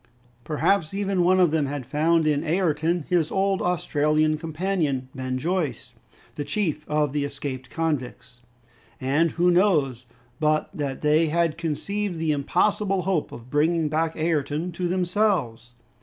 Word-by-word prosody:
Perhaps, 160 +4 0
even, 195 -2 0
one 185 +2 +4
of 175 -4 +4
them 155 -3 +1
had 140 -2 -4
found 160 +4 +2
in 150 -1 +1
Ayrton 165 -1 0
his 170 -4 +1
old 195 0 +1
Australian 155 -3 +1
companion 155 -5 -2
Ben 130 -1 -3
Joyce, 145 -6 -2 0.4
the 145 - -4
chief 155 -1 -2
of 150 -2 +1
the 145 -1 0
escaped 140 -2 -5
convicts. 140 -6 -3 0.6
And 145 +5 +1
who 175 +1 +3
knows 150 - +2 0.3
but 155 0 +1
that 145 -6 -4
they 155 +2 +3
had 165 0 +1
conceived 175 +4 -3
the 160 -1 0
impossible 185 +6 +1
hope 180 -4 -1
of 120 +2 -11
bringing 155 +1 +2
back 160 +1 0
Ayrton 155 +1 -1
to 175 +1 -2
themselves? 175 - 0
155 Hz, 140 wpm, -24 LUFS, 145-180 Hz, 0.6 s, one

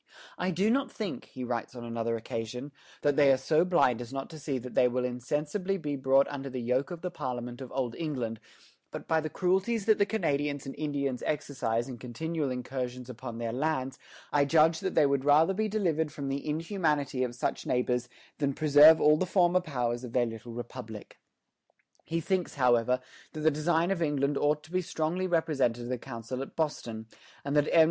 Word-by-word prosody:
"I 180 - 0
do 190 +5 +2
not 270 +1 +1
think," 210 -5 -5
he 130 - -8
writes 120 0 -3
on 120 - -7
another 115 0 -2
occasion, 115 +5 -5 0.3
"that 145 -1 +3
they 140 -2 +6
are 135 - +4
so 155 +5 +3
blind 170 -10 +3
as 120 0 -8
not 135 +3 -5
to 160 - -9
see 140 -2 -2
that 125 0 -7
they 125 - +5
will 125 +1 -1
insensibly 150 - -2
be 150 -5 -3
brought 135 0 +3
under 140 -1 -5
the 130 -1 -4
yoke 125 +3 0
of 175 -2 -7
the 180 0 -3
Parliament 125 -5 -5
of 130 - -8
Old 125 -3 -2
England; 125 -9 -3 0.5
but - - -8
by 160 -1 +2
the 155 - -3
cruelties 195 +6 +1
that 220 -1 +4
the 200 - +5
Canadians 145 -9 -1
and 135 - -5
Indians 140 -4 -2
exercise 130 -6 -1
in 125 -3 -7
continual 150 +4 -3
incursions 125 0 -4
upon 120 -1 -7
their 115 -1 -3
lands, 135 -1 -1 0.3
I 145 -1 +5
judge 160 +2 +4
that 190 - -3
they 155 - +6
would 140 -1 +1
rather 150 +6 +5
be 215 +3 0
delivered 165 -8 0
from 140 -2 -5
the 140 +2 -3
inhumanity 150 -5 0
of 120 -1 -3
such 125 - -2
neighbors 125 0 0 0.3
than 140 -2 0
preserve 155 +1 +7
all 150 +1 +5
the 185 - -1
former 180 0 +3
powers 125 -6 -2
of 120 -2 -7
their 125 -1 +3
little 115 +1 -7
republic." 120 -2 -8 0.9
He 165 +1 -1
thinks, 185 +1 -1
however, 125 -1 +3 0.3
that 155 - -5
the 160 +1 +4
design 165 +4 +1
of 190 -3 -1
England 145 -2 +1
ought 150 +1 +1
to 160 - -16
be 185 0 +1
strongly 175 +1 -1
represented 140 -9 +1
to - - -6
the 125 -1 -2
Council 115 +3 -6
at 135 - -7
Boston, 120 -8 -2 0.4
and 140 +1 -1
that 150 0 +3
M. 170 - +5
140 Hz, 200 wpm, -29 LUFS, 125-160 Hz, 0.9 s, preserve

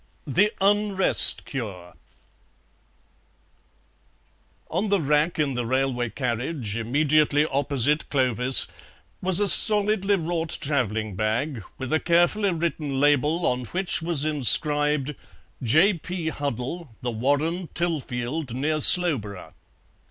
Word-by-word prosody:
THE 195 +9 +1
UNREST 200 -1 +2
CURE 100 -10 -7 2.8
On 210 +2 -2
the 200 -1 +1
rack 150 +2 0
in 145 -3 -1
the 120 -2 -4
railway 130 -1 -1
carriage 125 -1 -4
immediately 145 +5 +1
opposite 145 0 -1
Clovis 130 -1 +4 0.6
was 185 0 +3
a 205 - +1
solidly 205 0 +4
wrought 165 -2 -2
travelling 110 -7 -2
bag, 110 +4 -3
with 130 +2 -5
a 160 - +2
carefully 175 +4 +1
written 160 -5 -3
label, 145 +4 +1
on 125 0 -1
which 185 +4 -2
was 165 -3 -2
inscribed, 150 +1 +3 0.5
"J. 160 - +3
P. 175 -1 -5
Huddle, 140 0 -6
The 120 - -2
Warren, 145 +9 -2
Tilfield, 145 -5 -4
near 155 +4 -2
Slowborough." 135 - +4
145 Hz, 105 wpm, -23 LUFS, 125-170 Hz, 2.8 s, Clovis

